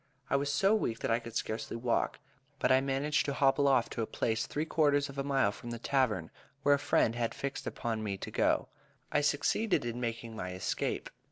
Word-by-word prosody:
I - - +4
was 140 +1 +1
so 195 +9 +3
weak, 120 - 0
that - - 0
I 115 - +3
could 115 -1 -10
scarcely 110 +1 -3
walk, 120 0 0 0.4
but 130 - +2
I 130 0 +6
managed 140 +3 +1
to 140 - 0
hobble 135 +1 +3
off 130 -4 +4
to - - -3
a 110 - -1
place 110 -1 -1
three 150 +2 -2
quarters 145 -3 +2
of 140 0 -7
a - - 0
mile 135 -7 +2
from 120 - -9
the 120 - -4
tavern, 115 -9 0 0.3
where 145 - +5
a 140 - +2
friend 125 -5 +2
had 120 -1 -2
fixed 140 0 -4
upon 115 -2 -2
for - - -4
me 100 -2 -2
to - - -7
go, - - +2
if - - -33 0.3
I - - +3
succeeded 150 - +1
in 120 +1 -3
making 115 -1 -4
my 90 -3 -4
escape. 90 - -2
130 Hz, 230 wpm, -32 LUFS, 115-140 Hz, 0.4 s, I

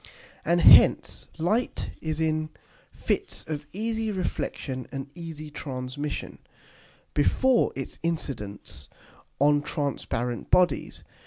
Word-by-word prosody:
And 170 +2 +2
hence - - +6
Light 215 +10 0
is 155 -1 -2
in 155 -1 0 0.4
Fits - - -2
of 150 -1 -4
easy 220 +3 -2
Reflexion 140 -8 -3
and 135 -1 -5
easy 160 -3 -8
Transmission, 140 0 -5 0.7
before 245 - +3
its 135 - -6
Incidence 105 - -4 0.5
on 145 +1 +4
transparent 125 -5 -3
Bodies. 180 -1 +2
150 Hz, 95 wpm, -27 LUFS, 135-170 Hz, 0.7 s, hence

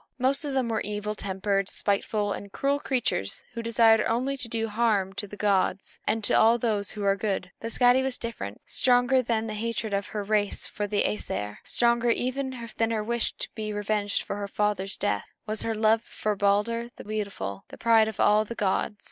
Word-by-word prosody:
Most 265 +3 +2
of 280 -2 -3
them 260 -3 +1
were 220 -1 0
evil 210 +1 -3
tempered, 195 -1 -1
spiteful, 205 0 0
and 200 - -8
cruel 280 +5 0
creatures, 250 - -1
who 235 - -4
desired 225 -1 +5
only 255 +4 0
to 255 -3 -4
do 225 -1 -1
harm 210 -3 +1
to 205 +1 -5
the 205 - -10
gods 195 -2 0
and 220 0 +1
to - - +2
all 230 +2 +6
who 210 -3 -1
were 195 -1 +3
good. 195 -2 -2
But 230 - -5
Skadi 245 +2 +5
was 265 -1 -1
different. 160 - -6
Stronger 250 +1 +3
than 225 -2 0
the 215 - -4
hatred 225 0 -3
of 200 -1 -1
her 210 -1 -4
race 205 0 0
for 205 - -4
the 205 0 +1
Æsir, 105 - -2
stronger 235 0 +2
even 255 0 -1
than 225 0 +2
her 220 -2 -1
wish 235 +1 -1
to - - -3
be 215 -1 -4
revenged 205 0 -1
for 200 - -4
her 200 -1 -3
father's 200 -1 -1
death, 205 - -1 0.2
was 215 -1 -3
her 225 -1 -1
love 220 +1 +3
for 215 -2 -3
Balder 210 +4 +1
the - - -10
beautiful, 200 - -4
the - - -11
pride 225 -1 +4
of 220 - -6
all 210 +1 +5
the 230 +2 -7
gods. 210 +1 0
215 Hz, 200 wpm, -27 LUFS, 205-235 Hz, 0.2 s, all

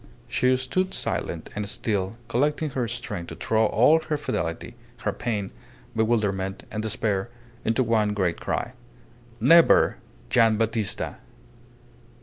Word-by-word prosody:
She 130 +1 +2
stood 185 +9 -1
silent - - -3
and 105 -1 -3
still, 100 -1 -2
collecting 150 +5 0
her 125 -2 -1
strength 105 -6 -5
to - - -7
throw 110 0 +2
all 125 +10 +5
her 155 -1 -2
fidelity, 85 - -3 0.3
her - - +1
pain, 105 -5 -3 0.4
bewilderment, 105 -4 0
and 105 - -3
despair 110 -1 -1 0.3
into 115 +3 +2
one 110 -3 +1
great 90 -4 0
cry. - - -2 0.7
"Never! 170 0 +6 0.3
Gian' 115 -2 +4
Battista!" 110 -2 -1
110 Hz, 125 wpm, -25 LUFS, 105-125 Hz, 0.7 s, Never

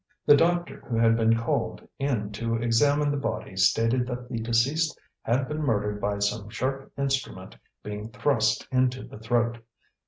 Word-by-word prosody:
The 145 - +8
doctor 175 +3 +1
who 115 - -1
had 115 0 +4
been 115 0 +3
called 115 - -2
in 120 -7 -1
to 115 +2 -2
examine 140 +6 +2
the 145 - -1
body 135 -7 -4
stated 115 +6 +2
that 125 -1 -5
the 115 -3 -3
deceased 125 +8 +1 0.2
had 130 +3 0
been 150 +1 -3
murdered 105 -6 0
by 100 0 0
some 100 +1 -1
sharp 135 +5 -3
instrument 135 -1 -2 0.3
being 105 +1 -6
thrust 115 -3 +1
into 130 0 +1
the - - -11
throat. 115 +1 0
115 Hz, 160 wpm, -26 LUFS, 110-135 Hz, 0.3 s, The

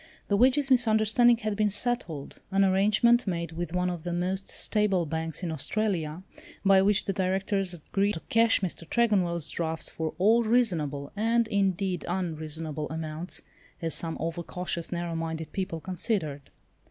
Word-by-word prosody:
The 200 - +3
wages 265 +5 +3
misunderstanding 235 0 +4
had 215 -2 -2
been 210 0 +2
settled, 205 - -3
an 195 0 +3
arrangement 210 +5 +3
made 170 -2 -2
with 165 0 -4
one 180 0 +1
of 175 -2 -5
the 175 - -3
most 185 +3 -2
stable 205 -5 +1
banks 160 +3 -4
in 170 - -2
Australia, 165 0 -2 0.4
by 195 -1 +6
which 205 +1 +3
the 195 - -1
Directors 190 0 0
agreed 195 +5 -1
to 165 - -6
cash 230 -1 +3
Mr. 170 -3 -4
Tregonwell's 180 -9 +1
drafts 160 -1 -2
for 160 -1 -4
all 220 +6 +4
reasonable, 170 - 0
and, 230 +2 +2
indeed, 190 -2 0
unreasonable, 160 -4 -3
amounts, 160 +2 -5 0.4
as 165 -2 -1
some 165 -1 +1
over 165 +1 -3
cautious, 175 -1 -4
narrow 170 -1 -3
minded 160 -1 -4
people 185 -4 -3
considered. 170 - -2
185 Hz, 155 wpm, -28 LUFS, 165-210 Hz, 0.4 s, by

